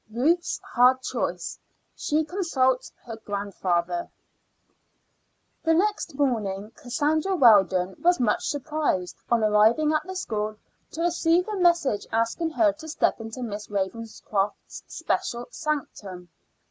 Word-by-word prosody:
RUTH'S 320 +10 +1
HARD 255 +1 +5
CHOICE: - - -3 0.4
SHE 310 +1 0
CONSULTS 280 -8 0
HER 225 -2 -7
GRANDFATHER. 185 -4 -2 1.5
The 325 0 +3
next 410 -4 0
morning 215 -7 -1
Cassandra 310 +8 0
Weldon 190 - +5
was 355 +1 +3
much 235 -4 +1
surprised, 290 - -2
on 235 -2 +2
arriving 220 +9 +4
at 310 - +2
the 375 - -6
school, 215 - -3 0.4
to 325 - -4
receive 345 +1 +2
a 425 - -2
message 340 - +2
asking 230 +9 0
her 315 -1 +3
to 315 +1 -11
step 310 -6 0
into 225 +3 -6
Miss 210 -2 -5
Ravenscroft's 205 0 -3
special 240 0 -2
sanctum. 200 - -4
245 Hz, 120 wpm, -25 LUFS, 210-315 Hz, 1.5 s, HARD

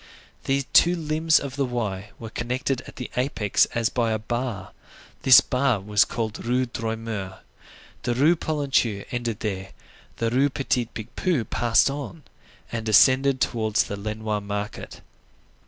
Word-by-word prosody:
The 135 0 +1
two 175 +1 +6
limbs 160 -1 +2
of 140 -1 -7
the 140 - +1
Y 105 -5 -3
were 115 -1 -8
connected 125 +2 -2
at - - -11
the 125 - -7
apex 125 -5 +2
as 115 -1 +1
by 120 -3 0
a 110 - +1
bar; 110 -3 -4 0.5
this 130 -2 +8
bar 125 -3 +1
was 105 +1 +3
called 110 -3 -4
Rue 125 +2 +1
Droit 115 -2 -4
Mur. 100 -4 -6 0.6
The 120 -1 -1
Rue 150 +7 +4
Polonceau 135 -10 0
ended 120 -3 -3
there; 95 -2 -4 0.5
Rue 125 +5 +2
Petit 130 -3 -1
Picpus 120 - -2
passed 120 +3 +3
on, 145 +2 -7 0.5
and 115 -1 -3
ascended 130 +5 +5
towards 110 -4 +1
the 100 - -5
Lenoir 105 +1 -3
market. 100 +1 -6
120 Hz, 145 wpm, -24 LUFS, 110-135 Hz, 0.6 s, this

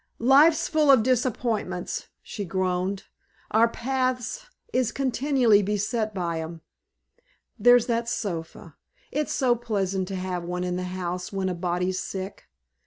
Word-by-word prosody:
"Life's 285 +6 +5
full 310 -3 +2
of 260 -5 +7
disappointments," 230 -7 -1 0.2
she 205 - -5
groaned. 185 +1 -1 0.5
"Our 225 +2 +5
paths 255 - -2 0.3
is 255 -3 +1
continually 260 -4 +3
beset 210 +2 -1
by 170 -4 -2
'em. 165 0 -7 1.0
There's 245 -1 +6
that 235 -1 -1
sofa! 165 -6 -5 0.3
It's 300 +1 -1
so 250 -3 +2
pleasant 195 -5 -2
to 195 - -4
have 185 -1 -3
one 180 +1 -3
in 180 0 -2
the 180 0 -3
house 180 0 -4
when 195 -1 -1
a - - -1
body's 180 +1 -1
sick. 190 +1 -6
205 Hz, 135 wpm, -25 LUFS, 180-245 Hz, 1.0 s, of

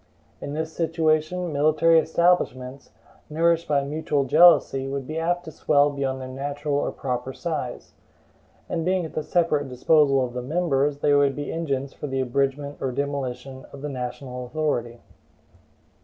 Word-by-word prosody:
In 140 - -5
this 160 +1 -3
situation, 165 +1 0
military 155 +3 +4
establishments, 150 -6 0 0.4
nourished 165 +2 +1
by 140 -2 +2
mutual 145 0 -1
jealousy, 135 -2 +5
would 135 -1 -4
be 155 +4 -4
apt 175 +2 -1
to 160 - -7
swell 145 -1 +2
beyond 135 -2 -2
their 130 - -6
natural 145 +3 -4
or 140 - 0
proper 125 0 -4
size; 150 -8 -5 0.7
and 165 - -2
being 185 0 0
at 160 - -9
the 155 - -2
separate 150 -4 0
disposal 135 +1 +3
of 120 - -8
the 125 - -3
members, 145 -1 0
they 145 - +3
would 140 -1 +3
be 145 - -4
engines 140 -5 -3
for 150 - -6
the 135 -1 -2
abridgment 140 +3 -1
or 130 - -1
demolition 135 -1 -4
of 140 0 -11
the 150 - -3
national 125 -1 -6
authority. 120 -5 -2
145 Hz, 155 wpm, -24 LUFS, 135-160 Hz, 0.7 s, jealousy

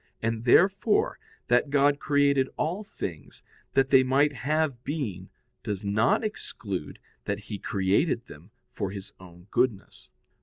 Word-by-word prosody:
And, 115 0 -2
therefore, 195 - +3 0.3
that 120 +4 +3
God 145 0 +3
created 140 -2 +2
all 180 +7 -1
things, 85 - -7 0.3
that 135 0 +3
they 135 -1 +8
might 140 +3 +2
have 140 -1 -1
being, 110 - -4 0.3
does 100 -2 -4
not 105 - +2
exclude 100 - -5 0.3
that 100 - -1
He 105 -1 -7
created 100 - +1
them 80 +1 -14 0.2
for 100 -3 -3
His 100 0 -8
own 90 -1 -14
goodness. 120 -5 -1
120 Hz, 130 wpm, -27 LUFS, 100-145 Hz, 0.3 s, they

